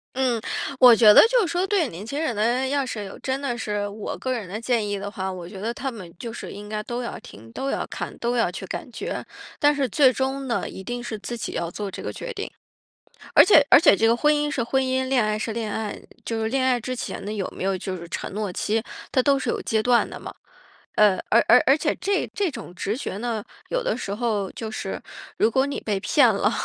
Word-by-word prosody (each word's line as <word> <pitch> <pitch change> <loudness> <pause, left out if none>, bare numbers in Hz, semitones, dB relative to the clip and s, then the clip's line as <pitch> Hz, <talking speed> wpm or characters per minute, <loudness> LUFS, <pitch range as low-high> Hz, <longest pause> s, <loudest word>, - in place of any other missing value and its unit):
嗯。 250 -3 +1 0.4
我 250 -2 +9
觉 215 -2 +8
得 - - +10
就 - - +3
是 385 - 0
说 355 +2 +1
对 385 -5 +1
年 180 +5 -8
轻 280 +7 -3
人 305 -8 -1
呢， 240 +5 +1
要 280 0 0
是 220 -4 -4
有 195 - -9
真 265 0 -2
的 245 -4 -2
是 210 -2 -2
我 205 +1 -6
个 260 - -3
人 225 -6 -4
的 200 +4 -5
建 230 -2 0
议 205 0 -2
的 200 +1 -5
话， 190 -2 -4
我 180 -2 -7
觉 195 - -9
得 225 +4 -2
他 270 +2 -4
们 185 -8 -10
就 235 - -5
是 - - -7
应 205 +1 -9
该 215 0 -2
都 240 +3 -4
要 240 - -5
听， 115 +3 -13
都 270 - -3
要 - - -2
看， - - -6
都 240 +1 -1
要 230 -7 +2
去 190 +1 -6
感 - - -5
觉， 440 - -5 0.3
但 295 -1 +5
是 280 -2 +1
最 260 +3 +5
终 265 +1 -2
呢， 235 - -1
一 190 - -9
定 245 +4 -4
是 225 -2 -4
自 240 +3 -5
己 - - -5
要 170 0 -2
做 205 +2 -4
这 - - -7
个 - - -3
决 - - -6
定。 415 -2 -5 0.9
而 - - +10
且 300 -8 +6
而 - - +9
且 315 - +6
这 225 - +3
个 230 - +4
婚 300 +5 +3
姻 295 0 0
是 285 -5 -1
婚 265 +3 +1
姻， 260 0 0
恋 260 -3 +3
爱 215 0 0
是 220 +1 -3
恋 220 -1 -3
爱， 215 -1 -4 0.2
就 225 -1 -2
是 - - 0
恋 265 +2 +1
爱 255 -1 +3
之 255 +2 -4
前 - - -5
呢， 210 - -3
有 200 -3 -3
没 - - -5
有 195 0 0
就 185 0 -4
是 170 0 -9
承 - - -4
诺 210 -1 -2
期， 220 +5 0 0.3
它 260 - +3
都 280 +2 +3
是 260 - -3
有 - - -1
阶 220 -1 0
段 245 0 +3
的 - - -7
嘛。 - - -8 0.6
呃， 210 -3 +5
而 230 - +5
而 250 - +7
而 270 +3 +5
且 300 0 0
这 395 0 0
这 400 -4 +1
种 230 -8 -9
直 200 +4 -2
觉 230 - -4
呢， 225 -1 -3 0.3
有 - - -1
的 - - 0
时 200 - -4
候 210 -4 -1
就 220 -1 -6
是， - - -5 0.4
如 - - +4
果 265 +3 +3
你 280 - -3
被 205 -3 -1
骗 245 +7 +4
了， 205 +2 +1
235 Hz, 280 characters per minute, -24 LUFS, 210-265 Hz, 0.9 s, 得